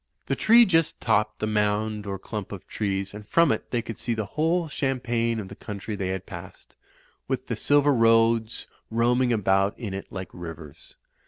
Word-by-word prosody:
The - - -1
tree 235 +2 +6
just 165 -5 +1
topped 105 -1 +1
the - - -2
mound 105 0 0
or 100 -1 -3
clump 105 0 -6
of 100 -3 -8
trees, 100 -2 -2
and 105 0 -10
from 165 -3 +4
it - - -3
they 120 -2 -1
could 115 -2 -7
see 120 - -1
the 110 -1 -2
whole 160 - 0
champaign 120 -5 -1
of 100 - -6
the - - -9
country 105 0 -6
they 95 -2 -3
had 95 0 -3
passed, 90 -1 -11 0.5
w^th - - -1
the - - -3
silver 145 0 +3
roads 115 -1 +3 0.2
roam 120 +2 +2
ing 125 -1 +2
about 100 -2 +2
in 110 -6 -5
it 95 - -6
like 95 -2 -6
rivers. 80 -4 -10
110 Hz, 190 wpm, -25 LUFS, 100-120 Hz, 0.5 s, tree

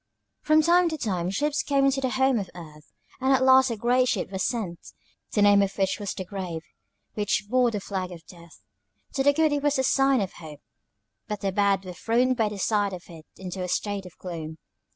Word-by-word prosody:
"From 310 0 +4
time 345 +1 +4
to 315 - -4
time 185 - -2
ships 295 +9 0
came 275 -2 +2
to 270 0 -2
the 260 - 0
Home 265 -1 +2
of 195 - -5
Earth, 155 -3 -12 0.3
and 265 +1 +1
at 260 0 +3
last 260 0 +6
a 230 - -3
great 250 +3 +2
ship 200 -5 -1
was 190 -1 -2
sent, 195 -9 -2 0.5
the 205 - +3
name 205 0 +6
of 200 0 -1
which 195 +1 0
was 205 -2 -4
The 185 - -5
Grave, 180 -4 -5 0.5
which 205 -1 -1
bore 250 +2 +3
the 215 -3 -3
flag 190 -2 -4
of 165 -3 -11
Death. 170 - -16 0.5
To 270 - 0
the 285 +1 +5
good 310 +1 +2
it 290 - 0
was 290 0 +1
a 265 - +1
sign 270 0 +3
of 195 -2 -3
hope, 155 -3 -11 0.7
but 210 -1 -4
the 195 - -1
bad 195 -1 +1
were 180 - -7
thrown 240 +7 +1
by 225 -4 0
the 210 - -7
sight 205 0 0
of 180 -1 -7
it 160 -2 -13
into 185 0 -6
a 180 - -2
state 200 +1 -2
of 180 - -16
gloom. 160 -3 -7
205 Hz, 225 wpm, -26 LUFS, 185-265 Hz, 0.7 s, last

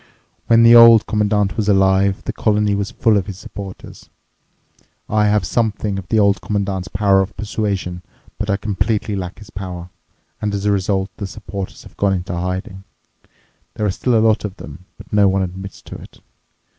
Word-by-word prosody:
When 115 0 +5
the 115 0 +8
Old 115 -2 +8
Commandant 105 -2 0
was 105 -2 0
alive, 95 0 +3
the - - -4
colony 105 -1 +1
was 100 0 -2
full 110 -2 +2
of 100 - -2
his 95 -3 -7
supporters. 95 0 -10 1.0
I 105 0 +2
have 105 -3 +2
something 105 -3 -1
of 90 - -10
the 110 - +1
Old 100 -3 +3
Commandant's 100 -2 -2
power 100 0 +2
of 95 +2 -5
persuasion, 100 -4 -3 0.4
but 105 - -3
I 100 - +2
completely 105 +1 -1
lack 90 -1 -5
his 105 0 -14
power, 90 -2 -7 0.5
and 105 -1 -1
as 100 0 -4
a 105 - +3
result 95 0 0
the 100 - -4
supporters 100 -2 -7
have - - -16
gone 100 -1 +2
into 90 0 -3
hiding. 90 +2 -4 0.9
There 105 - -2
are 100 - +1
still 120 +5 0
a 110 0 +3
lot 110 0 +2
of 100 -3 -5
them, 75 +5 -11
but - - -14
no 105 -1 +5
one 95 0 +1
admits 95 +1 -8
to - - -10
it. - - -15
100 Hz, 185 wpm, -19 LUFS, 95-105 Hz, 1.0 s, the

